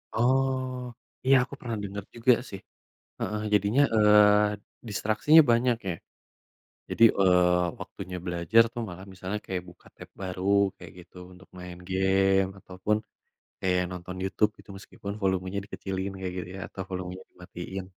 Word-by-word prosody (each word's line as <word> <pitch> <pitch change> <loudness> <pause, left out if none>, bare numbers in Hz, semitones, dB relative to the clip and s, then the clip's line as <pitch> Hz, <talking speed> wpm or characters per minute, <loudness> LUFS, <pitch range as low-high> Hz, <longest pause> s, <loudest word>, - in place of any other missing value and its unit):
Oh. 130 +1 +1 0.4
Iya 135 +1 +6
aku 135 - -10
pernah 115 -3 -4
denger 100 0 -5
juga 120 +2 +4 0.2
sih. 95 - -7 0.6
Heeh, 105 0 -2
jadinya, 105 +7 +3
eee, 105 -1 +5 0.3
distraksinya 110 +10 +5
banyak 120 0 +2
ya. 85 - -2 0.9
Jadi, 115 - +2 0.2
eee, 90 -1 +4
waktunya 90 +1 -7
belajar 90 +6 +4
tuh 120 - -4
malah 95 +2 -9
misalnya 95 +3 -4
kayak 90 -2 -3
buka 85 - -18
tab - - -12
baru, 90 0 -5 0.3
kayak 90 -4 -12
gitu 90 +1 -17 0.2
untuk 90 +2 -17
main 90 -1 -8
game 95 0 +2
ataupun 95 +4 -2 0.6
kayak 90 -1 +1
nonton 90 +1 -7
YouTube 105 +2 +1
gitu - - -16
meskipun 100 0 -8
volumenya 95 0 0
dikecilin 95 -1 -4
kayak 90 -1 -4
gitu 90 - -5
ya, - - -7
atau 95 - -6
volumenya 90 0 -6
dimatiin. 90 +1 -8
95 Hz, 145 wpm, -27 LUFS, 90-105 Hz, 0.9 s, Iya